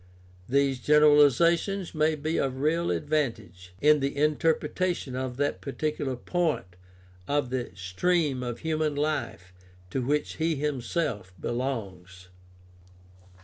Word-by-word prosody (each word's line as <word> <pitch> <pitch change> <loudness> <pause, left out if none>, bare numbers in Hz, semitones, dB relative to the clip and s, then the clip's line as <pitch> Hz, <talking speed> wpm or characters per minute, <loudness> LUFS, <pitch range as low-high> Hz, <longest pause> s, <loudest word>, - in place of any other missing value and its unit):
These 135 0 +2
generalizations 150 - +4
may 155 0 +2
be 155 +2 -2
of 130 -1 -1
real 165 +4 +1
advantage 115 - -2
in 150 0 +5
the 140 +1 -2
interpretation 155 0 0
of 130 -1 -4
that 145 +1 -1
particular 145 -1 -2
point 165 - -1 0.6
of 145 -3 0
the 130 -2 -2
stream 135 - 0
of 120 -2 -5
human 155 -2 -1
life 120 - -2 0.4
to 130 - -1
which 145 +4 -1
he 160 0 +1
himself 140 - -2
belongs. 95 - -4
145 Hz, 110 wpm, -27 LUFS, 125-155 Hz, 0.6 s, in